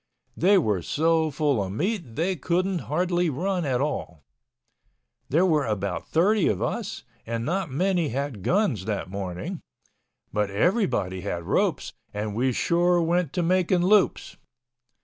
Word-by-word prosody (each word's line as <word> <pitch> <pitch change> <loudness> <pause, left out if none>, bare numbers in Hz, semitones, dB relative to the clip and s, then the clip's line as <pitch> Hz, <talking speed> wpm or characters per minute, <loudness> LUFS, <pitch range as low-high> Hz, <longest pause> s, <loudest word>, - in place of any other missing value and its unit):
They 195 +4 +4
were 105 - +1
so 160 - +1
full 145 -5 +1
of 95 -1 -4
meat 170 - -2
they 180 +4 0
couldn't 180 +4 0
hardly 175 +2 +1
run 180 +4 -1
at 130 -2 0
all. 110 - -3 1.1
There 165 +7 +3
were 155 -7 +2
about 100 -4 -2
thirty 195 +4 +3
of 100 - 0
us - - -3 0.2
and 115 0 -2
not 180 +1 -1
many 175 +3 +1
had 135 -4 -3
guns 150 - +1
that 105 -3 -3
morning—but 95 +2 -6
everybody 100 - 0
had 90 -3 -4
ropes - - 0 0.2
and 105 0 -3
we 125 +4 +1
sure 175 +7 +2
went 170 -2 +1
to 180 - 0
making 180 0 +2
loops. 200 +1 +2
155 Hz, 140 wpm, -25 LUFS, 110-180 Hz, 1.1 s, They